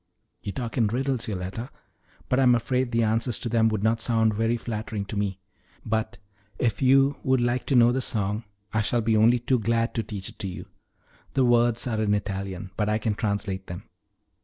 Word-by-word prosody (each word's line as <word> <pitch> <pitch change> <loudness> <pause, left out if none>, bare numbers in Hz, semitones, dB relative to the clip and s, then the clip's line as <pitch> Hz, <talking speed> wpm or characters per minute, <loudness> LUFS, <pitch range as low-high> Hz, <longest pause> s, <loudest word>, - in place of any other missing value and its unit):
"You 100 - -4
talk 120 +2 -4
in 115 - +4
riddles, 125 +2 -1
Yoletta; 100 +4 -4 0.6
but 130 - +1
I'm 125 -2 +5
afraid 125 +1 0
the 115 -1 +2
answers 115 +2 +1
to 120 - -4
them 115 -1 +3
would 110 -2 -2
not 110 +1 +2
sound 115 -2 +2
very 115 +2 +1
flattering 110 -3 -4
to 105 - -7
me. 100 -2 -1 0.5
But 110 +1 -1 0.4
if 115 -5 0
you 135 +2 +4
would 130 0 +2
like 120 +1 0
to 135 - +2
know 120 0 +6
the 130 +2 0
song 105 -1 -1 0.3
I 110 - +2
shall 120 +2 0
be 110 0 +2
only 115 +3 +5
too 125 +1 +1
glad 115 +1 0
to 115 - 0
teach 100 -4 -5
it - - -15
to 100 - -3
you. 90 - -7 0.7
The 135 -2 +4
words 120 -1 +3
are 110 -3 -1
in 105 -1 +2
Italian, 95 -2 -4
but 105 -1 0
I 105 - +2
can 110 0 -1
translate 100 -3 -2
them." 85 0 -7
115 Hz, 205 wpm, -26 LUFS, 105-120 Hz, 0.7 s, know